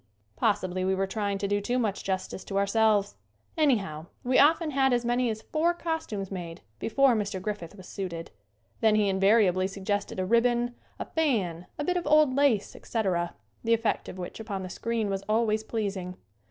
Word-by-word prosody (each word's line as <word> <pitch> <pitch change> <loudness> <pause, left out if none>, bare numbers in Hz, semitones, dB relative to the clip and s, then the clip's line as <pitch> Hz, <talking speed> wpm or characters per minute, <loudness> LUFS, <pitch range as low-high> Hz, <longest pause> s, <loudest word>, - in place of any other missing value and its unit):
Possibly 185 -4 0
we 190 +1 +1
were 195 +1 0
trying 200 0 -2
to 200 +1 -2
do 205 +1 +1
too 245 +5 -1
much 215 -5 -1
justice 190 0 -3
to 195 - -3
our 200 - +3
selves. 210 -1 +2 0.4
Anyhow 200 - +1 0.2
we 255 +1 +3
often 315 +2 +4
had 265 -2 +3
as 240 -1 +1
many 240 0 +1
as 220 0 -4
four 335 +2 +1
cos 325 -2 -3
tumes 195 -3 -5
made 175 -2 -6 0.2
before 270 +3 +3
Mr. 205 -3 -1
Griffith 200 -2 -5
was 185 -3 -12
suited. 170 -4 -5 0.5
Then 220 -1 +4
he 210 -2 +3
invariably 190 -1 +3
suggested 200 +1 -3
a 185 - 0
ribbon, 240 +3 +2 0.2
a - - -4
fan, 200 - 0
a 295 - -2
bit 360 +4 0
of 345 - -3
old 300 -3 +5
lace, 275 -8 +2
etc., 185 -6 -1 0.3
the 230 0 +4
effect 225 -1 -1
of - - -8
which 180 +3 -7
upon 205 -4 -4
the 185 - -6
screen 230 -2 -2
was 195 -1 -2
always 220 0 +2
pleasing. 195 -5 -3
210 Hz, 190 wpm, -28 LUFS, 190-240 Hz, 0.5 s, old